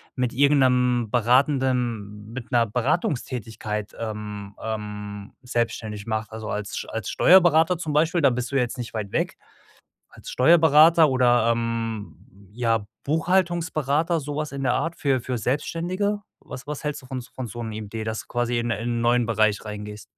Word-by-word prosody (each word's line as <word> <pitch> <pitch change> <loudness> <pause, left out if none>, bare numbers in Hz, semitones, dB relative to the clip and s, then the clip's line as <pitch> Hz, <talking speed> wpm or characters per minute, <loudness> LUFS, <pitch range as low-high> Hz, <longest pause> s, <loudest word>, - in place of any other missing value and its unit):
mit 125 -2 0
irgend 145 +1 +4
'nem 125 -2 +2
beratenden 120 -4 +1
mit 125 0 -8
'ner 120 -2 +4
Beratungstätigkeit, 115 - -2
ähm, 105 -2 -6
ähm, 105 -2 -6
selbstständig 115 -4 -3
machst. 110 0 -2
Also, 110 0 -6
als 105 0 -4
Sch - - -4
als 115 -3 -4
Steuerberater 175 -1 +5
zum 160 -2 -4
Beispiel, 165 +3 +2
da 140 - +6
bist 125 +1 -3
du 140 - -3
ja 135 - +4
jetzt 120 +2 -3
nicht 120 -2 -6
weit 105 -3 -4
weg, - - -1 0.7
als - - -12
Steuerberater 160 +2 +6
oder, 120 -3 +3
ähm, 115 -2 -3 0.3
ja 115 -1 0 0.2
Buchhaltungsberater, 165 -1 +1
so 145 0 -5
was 150 0 -3
in 140 -1 -5
der 125 -2 +2
Art 160 +6 -1
für 135 -3 +1
für 125 0 -3
Selbstständige? 175 - -1 0.2
Was 130 +2 -10
was 150 -1 -5
hältst 150 -1 -3
du 130 - -15
von 130 0 -5
s 125 0 -11
von 130 -1 -6
so 120 +2 -6
'nem 110 - -5
Idee, 110 +2 -5
dass 110 0 -3
du - - -21
quasi 120 0 -1
in 120 0 -1
in 115 +2 -2
'n - - -2
neuen 120 0 +3
Bereich 110 -2 +1
reingehst? 105 0 -7
120 Hz, 175 wpm, -24 LUFS, 110-145 Hz, 0.7 s, da